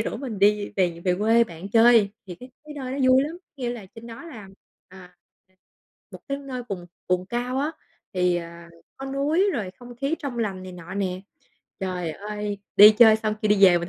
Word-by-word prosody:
rủ 220 - -3
mình 240 -7 -6
đi, 205 +1 +3
ờ, - - -13
về 175 -3 0
về 180 -1 +2
quê 225 +2 +4
bạn 175 0 -9
chơi. 225 -3 +5 0.2
Thì 180 - -7
cái 250 +7 -13
cái 300 -1 -10
nơi 260 -2 -5
đó 280 - -4
vui 260 +1 +6
lắm, 305 +3 -4
có - - -60
nghĩa 245 -3 -3
là 225 -5 -7
trên 225 +1 -11
đó 230 +8 -10
là, 220 -11 -10 0.4
à, 180 -1 -15 0.3
ờ, 185 - -35 0.6
một - - -10
cái 275 0 -2
nơi 260 -3 -6
vùng 180 -3 -5 0.2
vùng 180 0 0
cao 245 +3 -2
á, 295 +3 0 0.4
thì, 180 -1 +2
à, 170 0 -8 0.3
có 270 - -7
núi 300 +9 +1
rồi 200 -7 -3
không 245 -1 -12
khí 275 +5 -1
trong 265 -5 -5
lành 195 -4 -2
này 185 -1 -9
nọ 180 +1 -9
nè. 185 -2 -2 0.6
Trời 180 -3 -3
ơi, 210 +1 -5 0.2
đi 210 +2 +11
chơi 220 -2 +8
xong 215 -1 -2
kêu 215 - +1
đi 200 -1 +5
về 175 -2 +6
mình 170 +1 -5
210 Hz, 225 wpm, -24 LUFS, 185-250 Hz, 0.6 s, đi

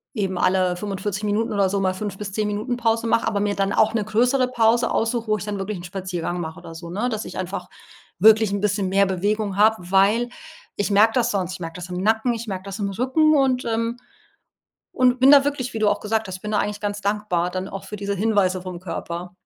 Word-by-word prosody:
eben 190 -4 -1
alle 185 -1 +2
45 195 +1 -4
Minuten 210 +2 0
oder 200 -2 +2
so 200 - -1
mal 185 -1 +1
5 200 0 -5
bis 205 -2 -6
10 215 0 0
Minuten 215 +4 -2
Pause 230 -1 +1
mache, 230 - +2
aber 205 - 0
mir 205 0 0
dann 195 0 0
auch 220 - +3
'ne 220 - 0
größere 245 +5 +2
Pause 235 -1 +2
aussuche, 230 0 -1
wo 215 0 +2
ich 205 - -7
dann 205 -1 -3
wirklich 195 +1 -4
'n 175 - -9
Spaziergang 180 -1 -4
mache 160 -1 -6
oder 165 - -10
so, 170 +1 -9
ne? 215 +8 -1
Dass 220 -1 -3
ich - - -8
einfach 185 0 -5 0.5
wirklich 220 +2 +5
'n 200 - -1
bisschen 205 -1 0
mehr 195 +1 +4
Bewegung 200 +2 -1
habe, 220 +2 +5 0.2
weil 205 +5 +3 0.5
ich 205 - -1
merke 215 +3 +5
das 240 -1 +2
sonst. 185 -3 -2
Ich 185 - -8
merke 165 -1 -6
das 180 0 -8
im 180 0 -4
Nacken, 220 +4 +2
ich 230 0 -6
merke 190 -2 -4
das 195 +1 -7
im 200 -1 -1
Rücken 265 +9 +2
und, 260 -2 +2
ähm 230 +1 -1 0.9
und 250 0 +2
bin 265 +2 +7
da 280 -1 +7
wirklich, 265 -4 -2
wie 225 - -3
du 215 - +2
auch - - +2
gesagt 220 0 -1
hast 185 - -5
ich - - -24
bin 210 - -5
da 210 - +1
eigentlich 205 0 -2
ganz 205 0 -2
dankbar 200 -4 -1
dann 185 +1 -4
auch 195 - -7
für 210 - -7
diese 200 0 -3
Hinweise 195 -3 +1
vom 180 -1 -7
Körper. 175 0 -6
205 Hz, 245 wpm, -22 LUFS, 190-225 Hz, 0.9 s, bin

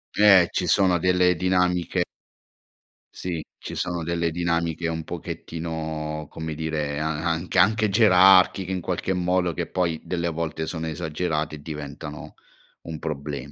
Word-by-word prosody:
Eh, 100 -4 +7
ci - - -1
sono 95 -3 +3
delle 90 +1 +3
dinamiche 90 0 +1 1.1
Sì, 85 -4 -4
ci - - -8
sono 85 -1 -2
delle 85 0 0
dinamiche 85 0 -1
un 80 0 -3
pochettino, 80 -2 -5
come 80 0 -5
dire 75 -2 -2
a 75 - -1
anche 80 +3 -2
anche 105 +4 +4
gerarchiche 95 -2 +5
in 95 -1 -2
qualche 90 +2 -2
modo, 90 -1 +1
che - - -3
poi 85 -4 -1
delle 85 -1 -2
volte 80 -1 -3
sono 80 -1 -4
esagerate 80 -1 -2
e 75 - -12
diventano 75 0 -8 0.5
un 80 -2 -7
problem 75 -2 -5
85 Hz, 140 wpm, -24 LUFS, 80-90 Hz, 1.1 s, Eh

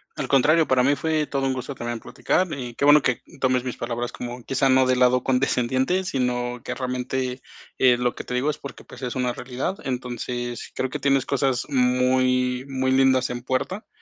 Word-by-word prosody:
Al - - -3
contrario, 155 +4 +4
para 130 -1 +3
mí 140 +3 +3
fue 155 0 0
todo 135 -2 -1
un 135 - 0
gusto 130 +2 -5
también 120 -2 -5
platicar. 185 +10 0
Y 125 -4 -6
qué 140 - 0
bueno 145 +1 +7
que 130 -3 0 0.2
tomes 130 -1 +2
mis 125 -2 -5
palabras 120 +1 -3
como, 120 0 -7
quizá 135 +1 +1
no 130 0 +5
de 130 0 +2
lado 125 0 +3
condescendiente, 130 +6 +1
sino 125 -5 -2
que - - -4
realmente, 130 0 -3 0.4
eh, 125 -2 +5
lo 125 0 0
que - - -7
te 125 - -5
digo 135 +5 +1
es - - -9
porque 140 - -9
pues 125 - -13
es 125 -2 -4
una 125 -1 0
realidad. 125 +10 -4
Entonces, 120 -1 -4
creo 130 - -2
que 150 - -4
tienes 135 -1 +2
cosas 135 -2 0
muy 125 -1 +2
muy 130 -1 -1
lindas 130 -1 +3
en 120 0 -4
puerta, 130 - -3
130 Hz, 200 wpm, -24 LUFS, 125-135 Hz, 0.4 s, bueno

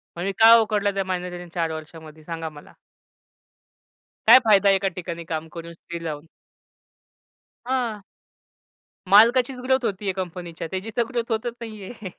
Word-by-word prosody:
म्हणजे 180 +3 -2
काय 225 +1 +9
उखडलं 210 -2 0
त्या 195 - 0
मॅनेजरनी 180 -1 -5
4 165 -2 -1
वर्षामध्ये 155 0 -10
सांगा 165 0 -5
मला? 150 -1 -15 1.5
काय 255 - +10
फायदा 205 -2 +5
आहे 195 - +5
एका 195 0 0
ठिकाणी 170 -2 -6
काम 160 -1 -4
करून, 170 0 -8
स्थिर 170 0 -9
राहून? 155 0 -6 1.4
हां. 245 -5 -2 1.1
मालकाचीच 240 +5 +5
ग्रोथ 260 -1 +1
होती 200 +1 -3
आहे 190 - 0
कंपनीच्या, 175 -3 -6
त्याची 190 +4 -5
तर 235 - +4
ग्रोथ 240 -2 -3
होतच 225 +2 -2
नाही 215 -3 -8
आहे. 220 -5 -8
190 Hz, 150 wpm, -23 LUFS, 170-225 Hz, 1.5 s, काय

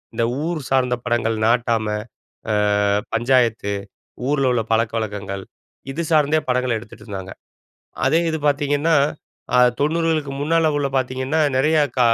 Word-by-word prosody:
இந்த 115 - +1 0.2
ஊர் 170 -3 -2
சார்ந்த 125 -2 +2
படங்கள், 115 -2 0
நாட்டாம, 115 -2 +1 0.6
அ - - +2 0.6
பஞ்சாயத்து, 115 -4 +2 0.6
ஊர்ல 140 -3 +2
உள்ள 115 -2 +1
பழக்கவழக்கங்கள், 105 -3 -2 0.5
இது 150 +5 -3
சார்ந்தே 155 0 +3
படங்கள 125 0 +1
எடுத்துட்டுருந்தாங்க. 100 -4 -9 0.8
அதே 160 - +4
இது 160 - -2
பாத்தீங்கன்னா, 145 +2 +1 0.6
அ 125 - +5 0.2
90களுக்கு 155 -1 0
முன்னால 165 +2 +2
உள்ள 140 -1 0
பாத்தீங்கன்னா, 130 +4 -1 0.2
நெறைய 155 +4 +3 0.2
க - - +2
130 Hz, 120 wpm, -21 LUFS, 115-150 Hz, 0.8 s, அ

